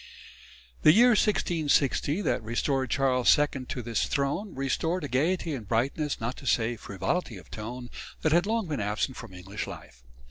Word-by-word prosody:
The 155 - +7
year 240 +4 +7
1660 165 - +2
that - - 0
restored 130 +4 -1
Charles 130 -3 +4
II 145 -3 -1
to 125 - -4
his 115 0 -1
throne, 145 +9 -1
restored 160 +6 -1
a - - -2
gaiety 160 +6 0
and 115 -7 -6
brightness, 135 +7 0
not 115 +3 -3
to - - -9
say 115 +1 +2
frivolity 105 - -3
of 90 - -15
tone, 120 +3 -7 0.3
that 155 - +2
had 175 +4 +3
long 225 -1 0
been 150 -5 -2
absent 105 +6 -1
from - - -9
English 95 +3 -6
life. - - -11
135 Hz, 170 wpm, -28 LUFS, 115-160 Hz, 0.3 s, The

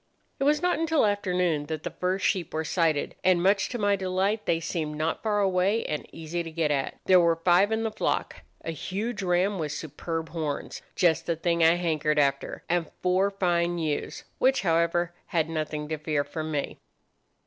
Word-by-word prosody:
"It 275 - +1
was 300 +3 +3
not 360 -2 +2
until 320 -5 +2
afternoon 180 -7 0
that 155 0 -4
the - - -4
first 185 +1 -1
sheep 175 -5 0
were 160 - 0
sighted, 160 -3 0
and, 180 -2 +3
much 195 +1 +3
to 245 - -3
my 205 -2 +2
delight, 190 +3 -1
they 165 - +2
seemed 160 -3 -3
not 155 +2 -1
far 210 -2 +1
away, 195 +3 +2
and 150 - -3
easy 165 +2 -4
to 165 - -6
get 160 -2 0
at. 140 -2 -1
There 185 -1 +6
were 170 -1 +4
five 175 +5 +3
in 220 0 0
the 225 - -1
flock: 215 - -1 0.3
a 165 - -2
huge 200 - -4
ram 185 +2 +1
with 150 -2 -2
superb 160 +2 -5
horns—just 160 +1 -1
the 170 - +1
thing 170 +1 +1
I 165 +1 +6
hankered 155 -3 0
after—and 150 +4 0
four 185 +2 +3
fine 175 -3 0
ewes, 155 -3 -3 0.2
which, 265 -2 +3
however, 170 0 +1
had 160 -2 0
nothing 155 -1 -3
to 155 -1 -3
fear 150 -2 0
from 155 +2 -5
me. 145 -2 -3
170 Hz, 185 wpm, -27 LUFS, 160-190 Hz, 0.3 s, There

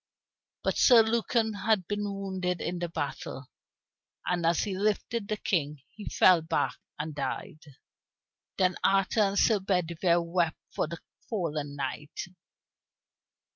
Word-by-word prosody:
But - - 0
Sir 240 -4 +8
Lucan 225 0 +1
had 200 -2 +1
been 205 0 -2
wounded 190 -3 -2
in 175 0 -3
the 175 0 -2
battle, 140 -3 -5 0.7
and 175 -2 +1
as 170 -1 +2
he 200 -3 -2
lifted 210 +2 -1
the 215 - -1
King 150 -8 -1
he 210 - -8
fell 180 -3 +5
back 160 - -1 0.2
and 155 +1 -4
died. 145 +1 -4 1.0
Then 185 -1 +2
Arthur 195 +3 +3
and 200 -1 +2
Sir 215 -1 +4
Bedivere 175 -2 +1
wept 170 -1 0 0.2
for - - 0
the 170 +2 -6 0.3
fallen 150 -9 -2
knight. 145 +2 -5
180 Hz, 135 wpm, -29 LUFS, 160-205 Hz, 1.0 s, Sir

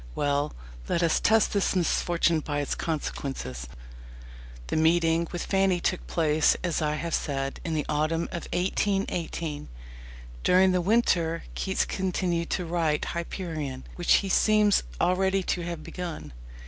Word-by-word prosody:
Well, 145 +1 0 0.4
let 170 - +1
us 165 - +3
test 220 0 +3
this 200 -1 +1
"misfortune" 170 -1 +2
by 145 -1 -3
its 145 - -1
consequences. 135 - -4 1.0
The - - -3
meeting 165 +1 +3
with 175 - -3
Fanny 195 -2 +2
took 180 +1 -2
place, 155 -2 +2
as 170 -2 0
I 150 0 0
have 165 +1 -4
said, 135 -1 -2
in 165 -2 -2
the 150 - -1
autumn 155 +2 0
of 170 - -5
1818. 180 -5 -1 0.7
During 185 +1 +5
the 180 -1 +2
winter 175 -5 +2
Keats 190 -1 0
continued 180 -3 -1
to 180 - -1
write 165 -3 0
Hyperion, 160 -6 -4
which 175 - -1
he - - -3
seems 210 +1 +4 0.2
already 190 +1 +2
to 180 - -1
have 170 -2 -5
begun. 165 - -6
170 Hz, 140 wpm, -27 LUFS, 155-185 Hz, 1.0 s, During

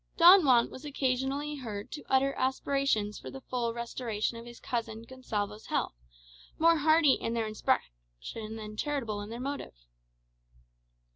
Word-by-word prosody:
Don 355 +2 +9
Juan 245 -4 +4
was 260 - -10
occasionally 280 +1 -1
heard 215 -6 -6
to 295 - -6
utter 270 +1 +3
aspirations 260 -5 0
for - - -8
the 270 - -8
full 245 -2 -2
restoration 235 -2 -3
of 230 +1 -9
his 240 0 -11
cousin 225 -2 -3
Gonsalvo's 215 -4 -4
health, - - -1 0.6
more 330 +1 +5
hearty 310 -1 +5
in 230 - -2
their 230 -1 0
expression - - -3
than 215 -1 -7
charitable 235 -5 -2
in 205 - -7
their 230 +1 -6
motive. 275 - -5
240 Hz, 145 wpm, -30 LUFS, 215-275 Hz, 0.6 s, Don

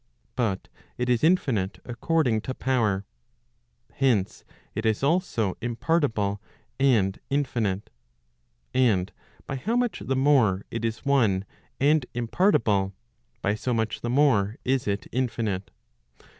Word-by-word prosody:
But 110 -7 -1 0.3
it 125 0 -1
is 120 +1 +2
infinite 130 - +2
according 125 -2 +1
to 130 +3 -5
power. 110 -7 0 0.9
Hence, 120 -8 +1 0.3
it 110 - -3
is 110 +2 +1
also 140 - +1
im¬ 120 -1 -3
partible 110 -12 +1 0.4
and 110 -8 +3
infinite. 120 -8 -1 0.8
And 105 -7 +2 0.3
by 135 - -4
how 220 - -1
much 245 -2 0
the 135 - -2
more 130 -8 +3
it 115 0 -4
is 115 +3 -3
one 110 -9 +2 0.3
and 145 -1 +3
impart¬ 150 - +2
ible, 100 -3 +2 0.5
by 100 - +2
so 120 +3 -2
much 110 -1 -1
the 120 - -3
more 120 -6 +3
is 130 -2 +1
it 100 0 -1
infinite. 110 -6 -2
120 Hz, 130 wpm, -26 LUFS, 105-135 Hz, 0.9 s, and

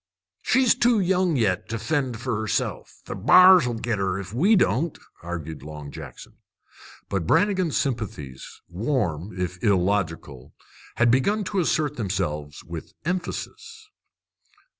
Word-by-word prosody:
"She's 260 -2 +4
too 240 -2 +3
young 185 -3 +1
yet 100 -8 0
to 115 - -2
fend 125 0 -2
fer 125 -1 -2
herself. 110 - -3
The - - -5
b'ars 180 - +7
'll 120 - -2
git 115 -2 -2
her, 95 -1 -1
if 100 +1 -8
we 190 - +4
don't," 160 - +1 0.2
argued 80 -4 -6
Long 75 -1 -9
Jackson. - - -11 0.7
But 90 -5 -2
Brannigan's 185 - +2
sympathies, 105 - -4
warm 95 - -2
if 90 0 -4
illogical, 90 - -1 0.4
had 120 -1 +3
begun 200 - +2
to 200 0 -2
assert 155 -4 0
themselves 80 -9 -3
with - - -8
emphasis. 430 - -5
115 Hz, 130 wpm, -24 LUFS, -, 0.7 s, b'ars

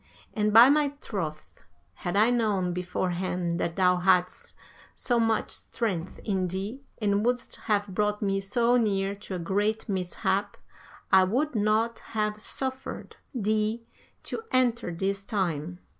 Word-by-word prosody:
And 210 -1 +1
by 230 +4 +9
my 290 0 +3
troth, 155 - -6 0.3
had 175 - -3
I 220 +4 +5
known 205 -7 +1
beforehand 180 -1 -2
that 170 - -1
thou 180 -1 +4
hadst 180 0 +1 0.4
so 240 -2 +1
much 225 -1 +1
strength 190 -7 -3
in 190 -3 0
thee, 195 +9 -4 0.2
and 205 -1 +1
wouldst 245 +1 -1
have 205 -1 +3
brought 210 +1 -1
me 195 -2 0
so 235 +5 +2
near 200 -4 +1
to 200 -1 -7
a - - -2
great 205 +6 -1
mishap, 195 +1 -1 0.5
I 190 -1 +7
would 260 +11 0
not 220 +1 +1 0.2
have 210 0 0
suffered 260 +2 -4 0.2
thee 215 +1 0 0.4
to - - -4
enter 240 -6 +2
this 195 +3 -2
time. 175 -5 -2
205 Hz, 140 wpm, -27 LUFS, 185-225 Hz, 0.5 s, by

